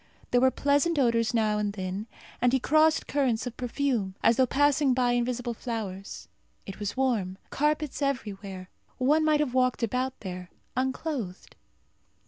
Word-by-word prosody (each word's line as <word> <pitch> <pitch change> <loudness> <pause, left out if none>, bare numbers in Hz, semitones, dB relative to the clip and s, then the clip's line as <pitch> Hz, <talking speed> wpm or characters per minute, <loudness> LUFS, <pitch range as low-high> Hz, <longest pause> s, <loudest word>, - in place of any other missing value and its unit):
There 245 - +4
were 260 - +6
pleasant 285 +5 +1
odours 230 -4 +2
now 215 -2 +1
and 205 -1 -1
then, 190 +2 -4 0.3
and 245 +1 +3
he 265 - +4
crossed 310 +4 +3
currents 260 -6 0
of 245 -2 -5
perfume, 245 -6 -1
as 230 - +5
though 260 -1 +4
passing 285 0 +3
by 250 -1 +2
invisible 245 0 -1
flowers. 215 -5 -6 0.4
It 195 - -8
was 205 +2 -4
warm. 220 -9 0
Carpets 300 0 0
everywhere. 200 -9 -3 0.3
One 295 +5 +3
might 305 -1 +3
have 270 -5 -1
walked 255 -1 +2
about 255 +3 -1
there, 180 -2 -6 0.3
unclothed. 255 - -3
245 Hz, 150 wpm, -28 LUFS, 210-275 Hz, 0.4 s, were